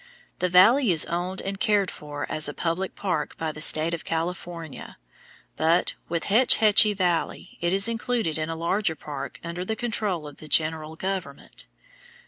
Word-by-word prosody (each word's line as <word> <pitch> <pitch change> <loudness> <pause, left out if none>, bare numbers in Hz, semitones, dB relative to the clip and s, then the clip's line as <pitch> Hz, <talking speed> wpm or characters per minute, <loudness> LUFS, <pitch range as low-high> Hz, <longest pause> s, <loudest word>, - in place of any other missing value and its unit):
The 180 - +1
valley 220 +7 +6
is 160 -3 +3
owned 180 +2 -3
and 195 0 -5
cared 205 -4 +2
for 145 -1 -6
as 155 -1 0
a 145 - -7
public 175 +3 -2
park 180 -7 -2
by 160 -1 -2
the 155 - -10
state 155 +1 +3
of 165 - -4
California, 165 -2 -5 0.6
but, 165 +2 +2 0.2
with 170 0 -1
Hetch 235 +5 +4
Hetchy 215 -1 +5
Valley, 175 -3 -2
it 170 0 +1
is 195 +3 +3
included 230 -8 -1
in 155 +1 -2
a 165 - -3
larger 170 +1 0
park 140 -2 -7
under 170 +1 -4
the 220 +4 -2
control 210 -8 -2
of 145 - -11
the 155 - -11
general 155 +1 +1
government. 185 -6 -5
170 Hz, 170 wpm, -25 LUFS, 160-195 Hz, 0.6 s, valley